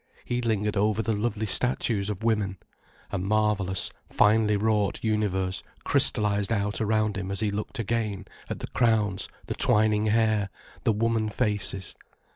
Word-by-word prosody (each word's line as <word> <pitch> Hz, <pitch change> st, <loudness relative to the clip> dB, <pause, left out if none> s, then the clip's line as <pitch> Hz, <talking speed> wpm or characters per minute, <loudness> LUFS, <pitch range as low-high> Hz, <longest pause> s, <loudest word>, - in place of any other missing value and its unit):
He 120 Hz, 0 st, -1 dB
lingered 105 Hz, -3 st, 0 dB
over 105 Hz, +2 st, +2 dB
the 110 Hz, -, 0 dB
lovely 110 Hz, 0 st, -1 dB
statues 110 Hz, -2 st, 0 dB
of 105 Hz, +1 st, -4 dB
women. 105 Hz, -4 st, +1 dB, 0.5 s
A 100 Hz, -, -1 dB
marvellous, 100 Hz, -2 st, +1 dB, 0.2 s
finely 105 Hz, 0 st, +4 dB
wrought 105 Hz, -1 st, +1 dB
universe 100 Hz, -4 st, 0 dB, 0.2 s
crystallized 105 Hz, 0 st, +1 dB
out 105 Hz, -1 st, 0 dB
around 110 Hz, -1 st, +1 dB
him 95 Hz, -1 st, -4 dB
as 100 Hz, -, -2 dB
he 105 Hz, -1 st, 0 dB
looked 105 Hz, +6 st, -4 dB
again, 110 Hz, -3 st, -2 dB, 0.2 s
at -, -, -4 dB
the -, -, -4 dB
crowns, 110 Hz, -5 st, +1 dB, 0.2 s
the -, -, -3 dB
twining 105 Hz, 0 st, +3 dB
hair, 110 Hz, -2 st, +2 dB, 0.4 s
the -, -, +5 dB
woman 110 Hz, 0 st, +1 dB
faces. 105 Hz, -4 st, -2 dB
105 Hz, 145 wpm, -27 LUFS, 100-110 Hz, 0.5 s, the